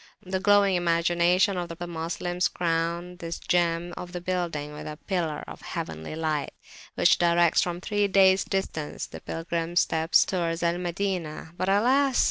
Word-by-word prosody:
The 190 0 -2
glowing 200 0 +4
imaginations 175 +2 +2
of 165 - -7
the 175 - -5
Moslems 175 +2 -2
crown 170 +1 -2
this 165 -1 -5
gem 175 0 0
of 180 0 -8
the 180 - -3
building 170 -5 -3
with 150 - -8
a 150 0 -6
pillar 170 -6 -2
of - - -10
heavenly 80 - -5
light, 155 -2 -2 0.4
which - - +4
directs 170 -1 +4
from 175 -1 -2
three 205 +2 0
days' 190 -1 +5
distance 160 -6 -3
the - - -10
pilgrims' 165 +1 -1
steps 160 +1 +3
towards 170 -2 -2
Al 170 +1 +1
Madinah. 175 -3 -3
But 185 - -1
alas! 255 +6 +3
175 Hz, 155 wpm, -26 LUFS, 165-185 Hz, 0.4 s, days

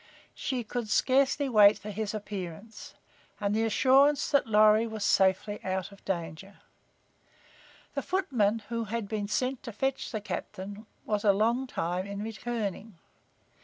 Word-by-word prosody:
She 255 -3 -3
could 230 0 -4
scarcely 275 +4 +2
wait 210 -4 +6
for 210 +1 -8
his 215 +1 -3
appearance 205 0 -7 0.4
and 205 -1 0
the 225 +1 +2
assurance 275 +5 +4
that 280 - +3
Lorry 215 +1 +5
was 220 -2 -4
safely 190 +2 +2
out 190 +1 -3
of 200 - -16
danger. 170 +1 -5 1.4
The - - -2
footman 230 - 0
who 230 -1 -2
had 225 0 -3
been 210 -1 -3
sent 255 +5 -1
to 235 - -7
fetch 265 +5 -2
the 220 - -2
captain 205 0 -7 0.2
was 210 -1 -1
a 205 -2 +5
long 235 +6 +1
time 180 -3 -2
in 200 +1 -5
returning. 220 -2 -4
215 Hz, 145 wpm, -29 LUFS, 200-235 Hz, 1.4 s, wait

